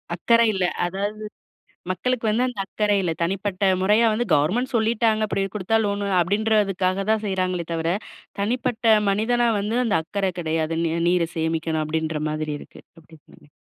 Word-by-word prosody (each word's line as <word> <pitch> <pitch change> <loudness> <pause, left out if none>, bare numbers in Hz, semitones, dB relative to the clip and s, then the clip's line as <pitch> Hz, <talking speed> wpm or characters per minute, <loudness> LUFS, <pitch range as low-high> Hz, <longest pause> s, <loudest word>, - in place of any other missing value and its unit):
அக்கறை 230 +6 +3
இல்ல. 190 -2 0 0.2
அதாது, 205 +4 -4 0.7
மக்களுக்கு 240 +6 -2
வந்து 230 +4 +2
அந்த 245 -5 -6
அக்கறை 205 +1 0
இல்ல. 175 -3 -1
தனிப்பட்ட 195 +2 -2 0.2
முறையா 210 +4 +4
வந்து 240 +3 -1
கவர்ன்மெண்ட் 195 - +1
சொல்லிட்டாங்க, 220 -1 +2
அப்படி 195 - -1
கொடுத்தா 210 +2 +1
"லோன்" 200 0 -1 0.2
அப்படின்றதுக்காகதா 200 0 +1
செய்றாங்களே 185 -3 -1
தவிர, 165 0 -1 0.5
தனிப்பட்ட 235 +2 -2 0.2
மனிதனா 235 +4 +2
வந்து, 210 +4 -1
அந்த 225 - +1
அக்கற 195 +2 -2
கெடையாது. 160 -1 -1
நீ 165 - 0 0.2
நீர 175 -1 +2
சேமிக்கணும் 160 -1 -1
அப்படின்ற 160 0 -2
மாதிரி 155 0 -3
இருக்கு. - - -14 0.2
அப்டி 160 0 -18
தானே? - - -19
195 Hz, 145 wpm, -23 LUFS, 170-220 Hz, 0.7 s, முறையா